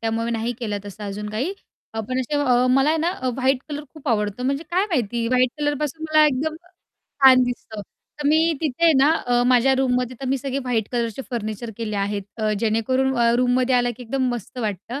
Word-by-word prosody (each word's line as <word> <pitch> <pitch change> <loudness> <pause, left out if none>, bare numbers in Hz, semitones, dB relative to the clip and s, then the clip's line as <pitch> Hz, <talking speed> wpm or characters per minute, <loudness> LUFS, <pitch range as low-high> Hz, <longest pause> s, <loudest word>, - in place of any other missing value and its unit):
त्यामुळे 225 +1 -1
नाही 230 +1 -1
केलं 210 -4 -3
तसं 205 +1 -8
अजून 205 +1 -5
काही. 255 - -2 0.4
अ, 225 - -1
पण 255 0 -1
असे 275 +4 -3
अ, 255 -3 +3
मला 270 +3 +4
आहे 320 - +2
ना 335 +3 +1
अ, 260 -9 -3
व्हाईट 265 0 +1
कलर 295 0 -5
खूप 310 -2 -7
आवडतो 210 0 0
म्हणजे 275 +3 -1
काय 370 +3 +2
माहिती 240 - -1
व्हाईट 255 0 +3
कलरपासून 295 +1 -2
मला 310 0 +5
एकदम 300 +3 -1 0.7
छान 260 -1 +8
दिसतं, 240 -3 -5 0.4
तर 290 - -1
मी 320 +2 +4
तिथे 315 +1 -1
आहे 330 - +7
ना, 280 +3 +5 0.2
अ, 245 0 +3
माझ्या 255 +1 +4
रूममध्ये 250 -1 0
तर 270 - -4
मी 270 0 +1
सगळे 270 +1 -3
व्हाईट 245 -5 -1
कलरचे 235 +1 -2
फर्निचर 225 -1 -4
केले 220 -3 -3
आहेत, 200 0 -1
अ, 215 -2 0
जेणेकरून 255 +4 +1
अ, 235 0 +4
रूममध्ये 250 +1 +2
आला 245 0 +2
की 250 - -10
एकदम 260 +2 -1
मस्त 240 +2 -8
वाटतं 220 +3 -4
250 Hz, 210 wpm, -22 LUFS, 225-275 Hz, 0.7 s, छान